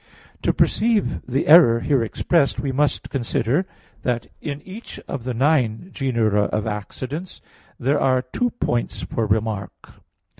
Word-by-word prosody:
To - - +2
perceive 220 -1 +1
the 130 +3 0
error 150 -8 +7
here 140 -4 +2
expressed, 140 +6 +1
we 140 - -1
must 145 +2 0
consider 135 - 0 0.3
that 120 -2 -1 0.2
in 145 0 -5
each 205 +5 -9
of 130 -4 -5
the 130 - -2
nine 130 - +1
genera 115 -6 +1
of 105 +1 -2
accidents 130 - -5 0.4
there 140 +3 +1
are 130 -1 +2
two 245 - -1
points 120 - -2
for 115 -2 -2
remark. 105 -2 -2
130 Hz, 140 wpm, -22 LUFS, 115-150 Hz, 0.4 s, error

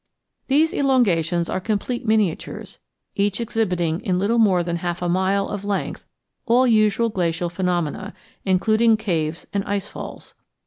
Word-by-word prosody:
These 305 +4 +3
elongations 175 - +2
are - - -2
complete 220 +4 -2
miniatures, 215 -6 -1 0.4
each 200 +1 0
exhibiting 180 -8 0
in 180 -1 0
little 215 +5 +1
more 190 -5 +4
than 170 0 -2
half 175 0 -3
a - - 0
mile 190 +3 +1
of 205 -1 -5
length 205 -1 -3 0.4
all 245 +3 +4
usual 225 -1 +3
glacial 175 -3 -1
phenomena, 180 +1 -2 0.3
including 215 +4 +3
caves 165 -7 -2
and 200 -1 0
ice 205 0 -2
falls. - - -9
200 Hz, 140 wpm, -22 LUFS, 175-220 Hz, 0.4 s, more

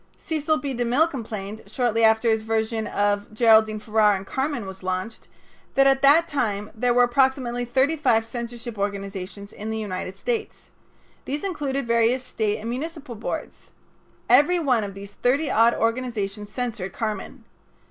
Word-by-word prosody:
Cecil 310 -1 -1
B. 285 -3 -4
De 245 0 -1
Mille 255 +7 +3
complained, 220 -7 -6
shortly 230 +1 0
after 220 +1 +4
his 220 0 +1
version 220 0 -1
of 205 0 0
Geraldine 220 -2 +5
Farrar 210 -1 +3
in 190 - -9
"Carmen" 265 -1 -2
was 190 0 -9
launched, 185 +4 -4 0.5
that 275 - +5
at 270 0 +4
that 300 +4 +6
time 210 -6 -2
there 245 +2 +1
were 245 +1 +5
approximately 245 -1 +1
thirty 265 +6 +2
five 235 -7 +2
censorship 235 -1 -6
organizations 200 0 -5
in 215 +1 -6
the 220 - -2
United 190 -3 -4
States. 450 - -4 0.5
These 290 +2 -3
included 285 -8 -2
various 235 +2 +2
State 215 -4 -1
and 220 - -7
municipal 295 0 -5
boards. 220 - -6 0.6
Every 355 +5 +5
one 260 -9 +2
of 200 -1 -6
these 200 0 -9
thirty 275 +8 +1
odd 230 +2 +4
organizations 220 -4 -2
censored 225 -7 -4
"Carmen." 220 +3 -4
230 Hz, 155 wpm, -24 LUFS, 210-265 Hz, 0.6 s, that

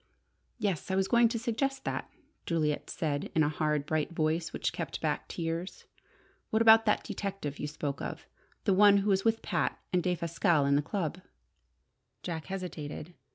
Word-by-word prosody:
"Yes, 195 -5 -1
I 190 - +1
was 190 0 +2
going 235 +1 +5
to 230 - -2
suggest 265 +4 -1
that," - - -3 0.4
Juliet 155 -3 0
said 145 -3 -2
in 160 - +5
a 150 - +2
hard, 150 -1 0
bright 155 +1 -1
voice 160 +1 0
which - - -2
kept - - -4
back - - -1
tears. 165 +2 -4 0.6
"What 220 - +2
about 225 0 +8
that 210 - +3
detective 195 -8 -4
you 150 - -2
spoke 145 -2 -4
of - - -5 0.4
the 200 - +3
one 200 +1 +7
who 210 - +3
was 195 0 +2
with 225 0 +1
Pat 175 - 0 0.2
and 180 - +3
Defasquelle 170 -3 +1
at 140 - +4
the 145 - +3
club?" 175 +1 -3 1.0
Jack 165 -3 -4
hesitated. 175 -4 -6
175 Hz, 170 wpm, -30 LUFS, 155-205 Hz, 1.0 s, about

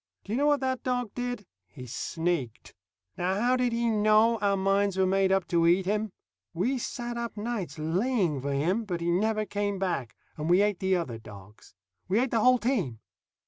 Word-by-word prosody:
Do 200 - -9
you - - +1
know 290 - +3
what 290 -2 +3
that 260 -1 -1
dog 245 -4 -1
did? 245 -4 -4 0.2
He 125 -4 -11
sneaked. 150 -1 -3 0.4
Now 185 +3 0
how 245 +3 +3
did 250 -1 +1
he 235 0 0
know 215 +1 +4
our 200 -1 +1
minds 195 0 +1
were 190 - +3
made 190 0 +2
up 190 -2 +1
to 170 -2 +3
eat 180 +2 +3
him? 210 +2 0 0.5
We 245 +10 0
sat 240 -1 -4
up 235 -2 -5
nights 210 -5 -4
laying 175 - 0
for 140 +2 -2
him, 170 +11 0
but 180 -5 -3
he 170 0 0
never 215 +4 +1
came 205 0 -2
back, 175 -11 -2 0.2
and 155 +1 -3
we 180 +3 +5
ate 205 -3 0
the 190 0 +2
other 130 -11 -3
dogs. 105 -2 -14 0.3
We 195 +4 +2
ate 255 0 0
the 230 - +2
whole 255 +3 +5
team. 205 - -1
200 Hz, 200 wpm, -28 LUFS, 175-235 Hz, 0.5 s, we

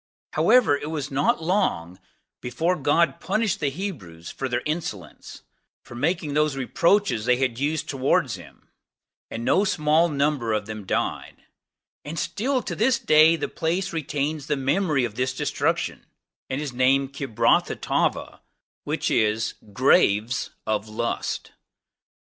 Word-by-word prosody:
However, 245 -12 +4
it 145 +1 -5
was 150 -2 -4
not 140 +4 +1
long 100 - 0 0.4
ere 160 +9 0
God 165 +3 +1
punished 215 0 0
the 145 - 0
Hebrews 130 - -7
for 135 - -4
their 120 - -1
insolence, 150 - -5 0.4
those 150 +2 -1
reproaches 145 - +1
they 125 0 +3
had 130 -2 -1
used 150 +2 -1
towards 135 -1 +1
him, - - -12 0.6
no 115 - +1
small 160 -3 +2
number 140 -6 0
of 105 -1 -1
them 110 -2 -8
died; - - -3 0.6
and 155 +3 -7
still 250 - -1
to - - -4
this 235 +2 +2
day 155 -1 +5
the - - -3
place 180 +3 -2
retains 150 -1 -2
the 150 - 0
memory 140 0 +1
of 115 - -5
this 130 +3 -2
destruction - - -1 0.4
and 130 - -2
is 145 -4 -4
named 135 +2 +2
Kibrothhattaavah, 135 -6 0 0.4
which - - -2
is, 110 +1 +1 0.2
Graves 110 -1 +2 0.2
of 110 0 -2
Lust. 115 +2 -3
140 Hz, 130 wpm, -24 LUFS, 120-165 Hz, 0.6 s, day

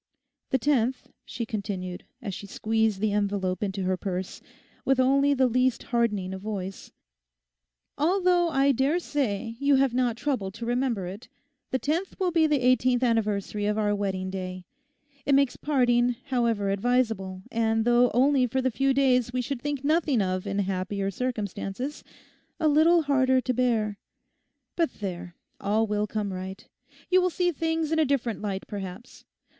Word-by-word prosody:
'The 265 - +2
tenth,' 260 -2 0 0.2
she 230 0 -4
continued, 195 -4 -5 0.2
as 200 - -4
she 200 - -7
squeezed 220 0 0
the 215 0 +1
envelope 200 -3 -1
into 195 -2 -2
her 185 0 +1
purse, 185 0 -4 0.4
with 270 -1 +2
only 275 +2 +4
the 260 -1 +3
least 255 0 +1
hardening 210 -6 0
of 190 - -6
voice, 195 -2 -5 1.1
'although 355 +1 +3
I 275 -2 +3
daresay 265 - 0
you 280 0 +4
have 270 -2 +3
not 245 -2 +1
troubled 220 -9 -2
to 230 - -6
remember 240 -5 0
it—the 260 +8 -8
tenth 325 +8 -2
will 370 -2 +1
be 325 -2 +4
the 295 -3 +1
eighteenth 255 0 +3
anniversary 210 -3 0
of 210 0 0
our 210 -1 +1
wedding 190 -2 -2
day. 185 -1 -5 0.6
It 280 - +3
makes 275 -2 +3
parting, 245 -4 +2
however 230 -6 +1
advisable, 200 -4 0
and 225 -1 +1
though 240 +1 +5
only 260 +1 +3
for 260 +3 -1
the 260 0 +1
few 270 +3 +1
days 250 -3 +3
we 255 0 -1
should 260 0 -4
think 290 -1 -3
nothing 300 -4 +2
of 185 0 -1
in 200 0 -2
happier 195 0 -1
circumstances, 245 +3 -4 0.6
a 315 - +2
little 320 +3 +5
harder 260 -2 +3
to 255 - -1
bear. 220 -5 0 0.8
But 335 -2 0
there, 180 -3 -6 0.2
all 215 +3 +1
will 210 0 -1
come 210 -2 -3
right. 190 +2 -7 0.4
You 370 0 +6
will 365 - +2
see 355 0 +1
things 320 0 -1
in 320 - +2
a 315 - +4
different 250 -6 -1
light, 195 -2 -3
perhaps. 200 +3 -8
235 Hz, 160 wpm, -26 LUFS, 200-275 Hz, 1.1 s, You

